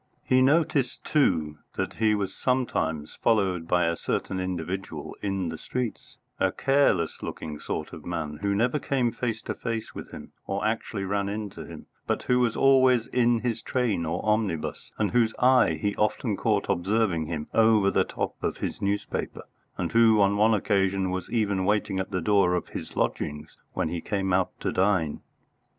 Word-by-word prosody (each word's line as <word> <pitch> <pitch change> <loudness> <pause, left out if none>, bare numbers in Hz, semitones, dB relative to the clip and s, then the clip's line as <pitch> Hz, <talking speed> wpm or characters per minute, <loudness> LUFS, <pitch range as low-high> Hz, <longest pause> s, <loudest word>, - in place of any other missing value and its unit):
He 130 0 +3
noticed, 140 -2 +2
too, 80 - +1 0.2
that - - -2
he 110 -1 +3
was 100 -2 -2
sometimes 80 - -1
followed 95 -7 +2
by 90 0 +3
a 85 0 +1
certain 95 - -2
individual 90 +1 -4
in 95 -3 -1
the 80 -1 -6
streets, 125 -3 -5 0.2
a - - +2
careless 135 - +2
looking 75 -2 -6
sort - - -4
of - - -9
man, 80 -4 -4
who 100 0 +1
never 125 +7 +1
came 130 -5 0
face 115 -2 -3
to - - -3
face 115 -2 -4
with - - -8
him, - - -10 0.2
or 100 +2 -2
actually 110 -2 -2
ran 100 +1 -1
into 105 -1 -5
him, - - -10 0.2
but - - -1
who 125 0 +2
was 120 -2 +1
always 130 -3 +5
in 120 -2 +2
his 115 -2 -2
train 120 -9 0
or 80 0 -3
omnibus, 105 -7 -1
and 105 -2 0
whose 115 -2 +2
eye 125 -1 +4
he 105 -2 -1
often 105 +1 0
caught 105 -1 +1
observing 90 -3 +1
him 75 -2 -3
over 110 -3 +4
the - - +3
top - - -3
of - - -1
his - - -4
newspaper, 100 +1 -2 0.3
and - - -2
who 115 -2 +5
on 100 0 +4
one 110 +2 +4
occasion 95 -2 +1
was 95 -1 -4
even 100 -5 0
waiting 100 -1 +1
at 95 - -3
the 90 -3 -2
door 95 -1 +3
of 90 - -3
his - - -7
lodgings 75 0 -2 0.2
when - - -1
he 85 0 -3
came 95 -1 -1
out 90 -1 +2
to - - -1
dine. 95 -5 +1
100 Hz, 180 wpm, -26 LUFS, 90-115 Hz, 0.3 s, always